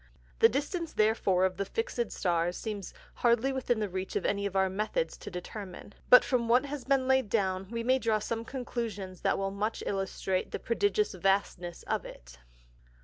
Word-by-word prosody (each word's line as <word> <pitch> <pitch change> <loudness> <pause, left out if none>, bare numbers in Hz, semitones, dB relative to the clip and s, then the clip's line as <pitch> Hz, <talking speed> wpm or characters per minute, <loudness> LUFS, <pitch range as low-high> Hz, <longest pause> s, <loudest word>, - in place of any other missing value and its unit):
The 455 - +7
Distance 330 +2 -2
therefore 205 -4 +3
of 185 -1 -1
the 200 - 0
fix'd 255 - -2
Stars 175 -1 0
seems 205 -4 -5 0.3
hardly 240 +3 +3
within 250 -3 0
the 210 - 0
reach 190 0 -5
of - - -1
any 200 0 +1
of 195 - -8
our 190 0 +4
Methods 215 - -1
to - - -8
determine; 190 +1 -8 0.2
but 250 - +10
from 245 -3 0
what 250 +4 +5
has 285 -2 -6
been 265 -1 +2
laid 265 -4 +3
down, 190 -1 0
we 230 0 -3
may 260 +2 +3
draw 225 -3 +2
some 225 +2 -3
Conclusions 225 -7 -5
that - - +2
will 195 0 -1
much 210 +3 -2
illustrate 190 -1 -1
the - - -3
prodigious 410 - +1
vastness 185 -2 0
of - - -1
it. - - -12
215 Hz, 185 wpm, -30 LUFS, 190-250 Hz, 0.3 s, but